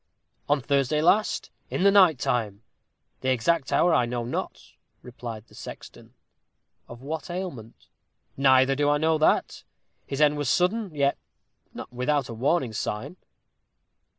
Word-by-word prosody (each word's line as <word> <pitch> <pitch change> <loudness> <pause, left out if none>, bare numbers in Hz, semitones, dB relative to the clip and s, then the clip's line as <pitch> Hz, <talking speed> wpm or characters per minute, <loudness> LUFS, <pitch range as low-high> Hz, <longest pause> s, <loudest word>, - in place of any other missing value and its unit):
"On 145 -1 +2
Thursday 140 +2 +1
last, 200 +7 +1 0.2
in - - -2
the 200 - +6
night 185 -7 +6
time. 110 -4 -2 0.6
The 130 - -2
exact 130 +4 +1
hour 175 -1 +3
I 125 -6 +2
know 120 -1 -3
not," 120 - -6 0.3
replied 115 -3 -8
the - - -23
sexton. - - -11 0.7
"Of 120 +2 -11
what 160 +5 -5
ailment?" 175 - -7 0.5
"Neither 130 0 +4
do 145 +1 +1
I 145 - +3
know 160 +1 +1
that. 155 - +1 0.4
His 135 - -4
end 150 -1 +4
was 145 -4 -1
sudden, 185 -1 0
yet 140 -1 +1 0.6
not - - -9
without 135 +2 -1
a - - -5
warning 130 +1 0
sign." 115 +9 -4
140 Hz, 145 wpm, -25 LUFS, 125-160 Hz, 0.7 s, the